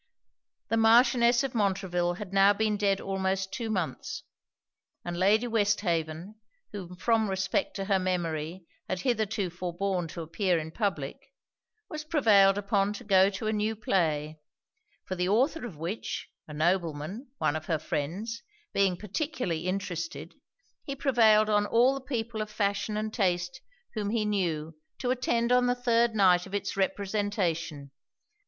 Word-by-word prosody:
The 225 - +1
Marchioness 235 +2 +5
of 270 - -3
Montreville 190 -5 0
had 195 0 -8
now 195 +1 +6
been 215 0 0
dead 200 -1 +1
almost 190 0 -2
two 230 -3 -3
months; 185 -7 -3 0.8
and 175 0 -3
Lady 205 +6 +3
Westhaven, 200 -4 -1 0.3
who 180 -3 -7
from 220 +3 +1
respect 195 +10 -1
to 195 - -3
her 195 -1 +2
memory 175 -1 -2 0.2
had 185 -1 -2
hitherto 215 -6 0
forborne 180 +1 -2
to 165 +1 -6
appear 180 +2 0
in 160 0 -4
public, 160 -8 -2 0.7
was 310 0 -6
prevailed 210 - +4
upon 200 0 +1
to 230 - -8
go 195 -2 +5
to 200 +2 -6
a 215 - +1
new 215 +1 0
play; 155 -7 0 0.7
for - - -4
the 180 0 -1
author 255 +6 +1
of 180 -10 -11
which, 170 +8 -4 0.2
a 150 - -9
nobleman, 170 - -1
one 150 - +1
of 155 0 -5
her 165 - +1
friends, 185 +11 -4 0.3
being 195 -3 +2
particularly 210 - -3
interested, 185 -3 -4 0.5
he 275 - -5
prevailed 225 -6 +4
on 205 -1 +2
all 245 +5 +4
the 275 - -5
people 230 -4 -3
of 215 - -4
fashion 210 0 -1
and 215 0 -3
taste 180 -3 0 0.3
whom 210 -2 -2
he 215 -1 0
knew 165 -6 -1 0.2
to 250 - -1
attend 240 -2 0
on 250 0 +4
the 245 - +2
third 235 -2 +2
night 185 -3 +4
of 195 - -5
it's 200 -1 -2
representation. 190 - -1
200 Hz, 150 wpm, -28 LUFS, 175-220 Hz, 0.8 s, now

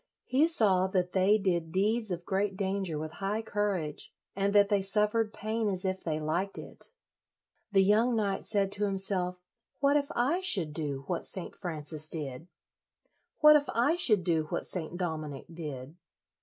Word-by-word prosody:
He 280 +5 +3
saw 195 - +3
that 180 -1 0
they 195 +3 +4
did 175 -5 -1
deeds 215 +5 +1
of 175 -1 -4
great 195 0 -1
danger 190 -4 -2
with 155 +1 -5
high 210 +3 -1
courage, 200 -8 -2 0.2
and 200 +1 +1
that 205 0 +5
they 200 -1 +2
suffered 210 +3 +1
pain 215 +1 -2
as 185 -1 -1
if 190 0 -2
they 155 -2 -2
liked 170 +6 -2
it. - - -7 0.9
The 195 -1 +5
young 220 +5 +3
knight 200 -3 -1
said 200 -2 +1
to 205 +1 -1
himself, 190 -2 0 0.4
"What 280 +1 +3
if 285 -1 0
I 270 +9 +2
should 185 - +1
do 145 -3 -3
what 175 +1 -3
St. 185 - -5
Francis 155 -3 -4
did?" 150 -1 -3 0.9
"What 300 0 +9
if 290 -1 +2
I 245 +8 +3
should 215 - +3
do 165 -2 +1
what - - -3
St. 175 -1 -4
Dominic 155 -6 -4
did? 150 -3 -7
195 Hz, 170 wpm, -30 LUFS, 165-210 Hz, 0.9 s, What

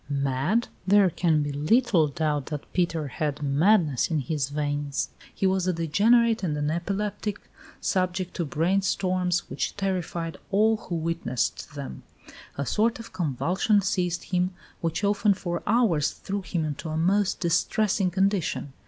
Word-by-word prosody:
Mad? 140 - 0 0.2
There 200 -2 +5
can 160 -3 +2
be 145 - -3
little 170 - +3
doubt 150 -1 -1
that 150 -2 -6
Peter 165 -4 0
had 150 +2 -3
madness 150 - +3
in 160 -3 +1
his 140 0 -2
veins. 145 -1 -2 0.2
He - - -2
was 190 -1 +2
a 185 - +2
degenerate 220 +8 +3
and 155 -6 -1
an 145 +1 0
epileptic, 200 +4 -2 0.4
subject 185 -1 -1
to 175 - 0
brain 170 +7 +1
storms 180 -1 0
which - - -3
terrified 175 -4 -2
all 215 +3 +3
who 180 - -5
witnessed 165 -7 -2
them. 65 -1 -6 0.6
"A 140 - -1
sort 220 - +1
of 230 - -10
convulsion 180 - +1
seized 180 -3 -1
him, 180 0 -1 0.2
which 165 +3 -2
often 205 0 +3
for 175 -2 -3
hours 205 -10 +3
threw 200 +1 -5
him 175 -4 -2
into 150 +1 -4
a 155 - -2
most 195 +4 +2
distressing 190 +3 +1
condition. 190 -7 0
175 Hz, 150 wpm, -26 LUFS, 150-195 Hz, 0.6 s, There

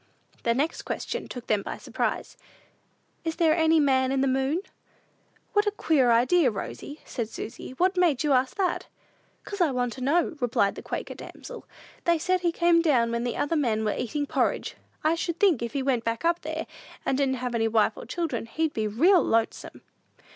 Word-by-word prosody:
The 235 0 +1
next 295 +6 -1
question - - -4
took 245 -2 -8
them 210 -2 +1
by - - -6
surprise: - - -3 0.9
"Is 325 -1 -2
there 325 -2 +3
any 320 -1 +4
man 260 -3 +3
in 270 -1 +1
the 275 - +2
moon?" 270 +6 +1 0.9
"What 415 0 +3
a - - +3
queer 300 -10 +2
idea, 255 +6 +4
Rosy," 240 +7 -7
said 230 -4 -4
Susy; 230 - -7
"what 370 +2 +2
made 330 -7 +3
you 295 -2 +3
ask 255 +5 +1
that?" 370 -3 0 0.6
"'Cause 400 -2 -4
I 340 - +4
wanted 250 -2 -2
to 255 - -3
know," 325 +2 +1
replied 230 -5 +1
the - - -8
Quaker - - -5
damsel. - - -10 0.4
"They 340 -1 +4
said 365 +3 +1
he 345 -1 +2
came 340 0 +3
down 250 -8 +2
when 235 0 -1
the 245 - -2
other 290 +3 0
man 230 -8 +1
was 210 - -1
eatin' 290 +5 -2
porridge. - - -1 0.3
I 310 +1 +3
should 335 0 -3
think, 365 - +4
if 235 -1 -4
he 275 - -1
went 255 -4 +1
back 230 +7 -2
up 340 +1 +2
there, - - -4 0.4
and 270 - +1
didn't 270 -1 +1
have 250 -1 -4
any 225 -1 +1
wife 220 -1 +2
and - - -10
children, 315 -10 -2
he'd 315 +5 -1
be 220 -1 -1
real 340 - +4
lonesome!" 225 0 -1
275 Hz, 200 wpm, -26 LUFS, 235-335 Hz, 0.9 s, any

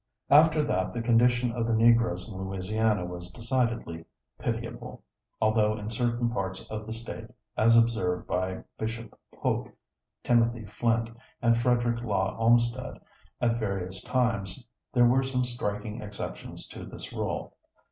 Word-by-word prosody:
" - - -46
After 155 -1 +2
that 95 -8 0
the 120 - -2
condition 120 +1 +3
of 115 0 -1
the 115 - +2
Negroes 115 -5 +4
in 105 - -8
Louisiana 95 +1 0
was 90 0 -7
decidedly 115 -6 -1 0.4
pitiable, - - -4 0.4
although 110 -1 +3
in 105 +1 -5
certain 120 0 0
parts 95 -4 -3
of 110 0 -5
the - - -5
State, 115 +1 -6 0.3
as 115 +1 +5
observed 115 -6 +2
by 95 +1 -2 0.2
Bishop 115 0 -4 0.2
Polk, - - -1 0.5
Timothy 120 -1 +2
Flint, 115 +2 0 0.3
and 115 -1 +4
Frederic 120 0 +1
Law 100 -4 0
Olmsted 120 +2 +3 0.4
at 120 -1 +1
various 95 -3 -3
times, 115 -3 -1 0.3
there 120 -3 +5
were 125 +2 +4
some 130 -1 0
striking 105 -3 -4
exceptions 105 -1 -7
to - - -8
this - - -8
rule. - - -3
115 Hz, 140 wpm, -28 LUFS, 105-120 Hz, 0.5 s, as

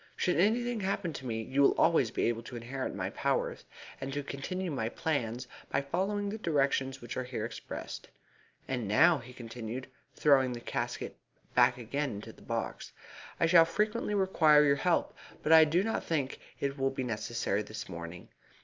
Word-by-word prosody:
Should 180 - +1
anything 235 +4 +2
happen 190 -4 -1
to 135 - -6
me 110 -1 -2
you 130 +5 0
will 140 - +5
always 160 -8 +4
be - - -2
able 115 -1 +1
to - - -8
inherit 125 +3 -4
my - - -3
powers, - - -1 0.4
and 135 0 -4
to 145 +1 -2
continue 175 +7 -4
my 115 -6 -1
plans 125 -5 -2 0.2
by - - +1
following 195 +8 -1
the 215 +2 -4
directions 135 -6 +1
which 120 - -6
are 130 -1 -3
there 110 -3 -2
expressed. - - -7 0.6
And 125 -5 -2
now," 140 - +5
he 125 +1 -11
continued, 120 0 -6 0.3
throwing 135 -4 +4
his 120 - -9
casket - - -3 0.4
back 125 0 +5
again 135 +3 -2
into 100 +1 -8
the - - -19
box, - - -4 0.5
"I - - +4
shall 165 0 +7
frequently 210 +5 0
require 160 -6 +5
your 140 0 +4
help, 180 +1 +1 0.3
but 155 - +1
I 160 -1 +9
do 170 +5 +2
not 225 - -1
think 145 -5 -1 0.2
it 140 0 -2
will 135 0 +2
be 135 -1 -3
necessary 115 -3 -1
this 110 +1 -7
morning. 85 +1 -8
135 Hz, 180 wpm, -31 LUFS, 120-165 Hz, 0.6 s, I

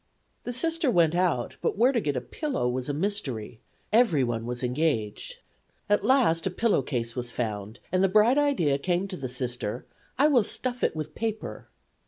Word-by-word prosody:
The 245 - -2
Sister 325 +3 +1
went 170 -7 +3
out, 175 -9 0
but - - -1
where 245 +5 +5
to 240 -4 0
get 145 -6 -1
a - - -1
pillow 265 - -2
was 125 +2 -2
a - - +2
mystery; 140 - -3 0.3
everyone 135 - +2
was 125 +1 -4
engaged. 125 -5 -1 0.5
At 205 - +3
last 230 -11 +3
a - - +1
pillow 215 -1 +1
case 120 -3 -3
was 125 -1 -3
found, 110 -2 -4
and 185 +1 +2
the 195 - +4
bright 215 +8 +5
idea 175 - +2
came 180 +4 0
to 190 - -4
the 135 -6 -5
Sister: 125 -2 -4 0.3
"I 285 +3 +5
will 260 -7 +4
stuff 245 +3 -3
it - - +1
with 155 -1 -5
paper." 220 -1 -4
165 Hz, 185 wpm, -27 LUFS, -, 0.5 s, where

